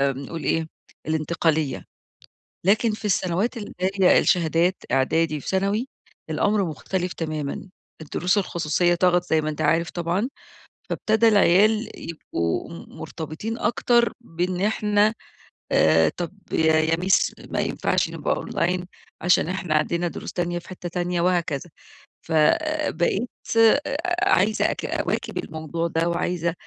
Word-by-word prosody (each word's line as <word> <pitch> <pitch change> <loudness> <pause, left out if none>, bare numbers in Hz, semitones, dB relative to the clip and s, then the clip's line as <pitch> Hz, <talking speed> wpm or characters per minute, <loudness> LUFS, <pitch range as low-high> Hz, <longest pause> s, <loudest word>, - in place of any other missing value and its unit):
بنقول 140 +3 -2
إيه 160 0 0 0.4
الانتقالية. 160 -2 0 0.8
لكن 215 +3 +3
في 215 +1 -6
السنوات 195 +4 0
اللي 210 - -7
هي 190 0 +4
الشهادات 170 +1 +2 0.2
إعدادي 150 +4 +1
وثانوي 200 - -1 0.4
الأمر 200 +6 +1
مختلف 180 +3 -3
تمامًا، 155 +2 -4 0.3
الدروس 180 +5 0
الخصوصية 175 -2 +1
طَغَت 180 0 +3
زي 160 -1 +3
ما 155 - -2
أنت 150 - -4
عارف 165 +1 +2
طبعًا، 175 +7 -1 0.6
فابتدى 220 +1 +2
العيال 215 +2 +4 0.2
يبقوا 85 - -3
م - - -11
مرتبطين 160 +9 -5
أكتر، 235 0 +2
بإن 180 0 -2
إحنا 210 0 +2 0.6
آآ، 80 +1 +5
طب 175 +1 -4 0.2
ي - - +1
يا 160 +1 +3
مِس 185 +1 +2
ما - - -4
ينفعش - - 0
نبقى - - -1
أونلاين 180 +1 -1 0.3
عشان 180 -2 +3
إحنا 180 -3 -2
عندنا 170 +3 +1
دروس - - -7
تانية 175 -1 -2
في 175 - -14
حتة 180 -1 -7
تانية 175 0 -2
وهكذا، 170 -3 0 0.5
ف - - -12 0.6
بقيت 195 +8 0 0.3
أ 270 +6 +4 0.3
عايزة 210 +4 +3
أك - - -5
أواكب - - -2
الموضوع 160 +1 -3
ده 165 +1 0
وعايزة 170 -1 -1
175 Hz, 130 wpm, -24 LUFS, 160-195 Hz, 0.8 s, آآ